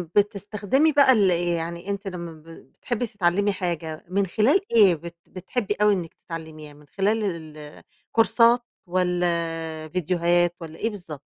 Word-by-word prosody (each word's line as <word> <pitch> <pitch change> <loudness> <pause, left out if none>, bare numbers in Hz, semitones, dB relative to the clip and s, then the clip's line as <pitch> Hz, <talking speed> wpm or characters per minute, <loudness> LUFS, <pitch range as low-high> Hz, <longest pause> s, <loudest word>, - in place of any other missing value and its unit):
بتستخدمي 205 - +2
بقى 280 -2 +6
ال 205 -6 +4
آآ 175 - +3 0.2
يعني 170 +3 -5
أنتِ 200 0 -3
لمّا 170 -4 -7
بتحبي 210 - -5
تتعلمي 205 -1 +1
حاجة 170 -4 -4
من 195 +1 +1
خلال 230 - +3 0.2
إيه 200 -6 +7
بت 170 +2 -10
بتحبي 200 +3 -3
أوي 210 0 +5
إنِك 175 -4 -4
تتعلميها، 160 -3 -9
من 145 0 -18
خلال 205 +6 0
ال 165 -6 -4
آآ 150 -1 -11 0.3
كورسات 235 +1 +4 0.3
والّا 180 0 0 0.6
آآ - - -9
فيديوهات، 175 +1 +1
والّا 160 -1 -9
إيه 225 - 0
بالضبط؟ 175 -9 -8
180 Hz, 155 wpm, -24 LUFS, 165-210 Hz, 0.6 s, إيه